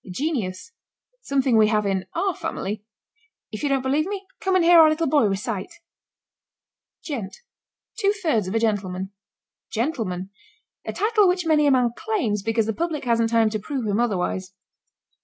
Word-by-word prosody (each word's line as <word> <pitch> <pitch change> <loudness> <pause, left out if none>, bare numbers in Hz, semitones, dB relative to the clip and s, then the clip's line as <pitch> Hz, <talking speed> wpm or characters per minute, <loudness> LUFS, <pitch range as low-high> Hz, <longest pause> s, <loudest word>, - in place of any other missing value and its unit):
GENIUS. 225 - -3 0.5
Something 270 - +1
we 215 -1 +6
have 210 -1 +1
in 190 -1 -1
our 390 -2 0
family 220 - -4 0.7
if 215 - -6
you 290 - 0
don't 270 -2 +1
believe 290 +5 +1
me, 395 -1 -5
come 380 -1 0
and 360 -2 +3
hear 345 0 +8
our 315 -1 +8
little 310 +2 0
boy 285 -4 +3
recite. 200 - -3 1.3
GENT. 230 - -5 0.6
Two 400 -2 +3
thirds 315 - 0
of 190 - -3
a - - +3
gentleman. 195 -4 -1 0.6
GENTLEMAN. 215 - -2 0.5
A - - -4
title 425 -2 +3
which 360 -1 +1
many 305 -2 +3
a - - +5
man 250 -3 +3
claims 365 - -1
because 225 +1 0
the 225 - -1
public 325 0 -3
hasn't 230 -1 +2
time 225 -1 +3
to 215 - -2
prove 255 +3 -4
him 205 +1 0
otherwise. 190 -4 -1
240 Hz, 165 wpm, -23 LUFS, 210-325 Hz, 1.3 s, hear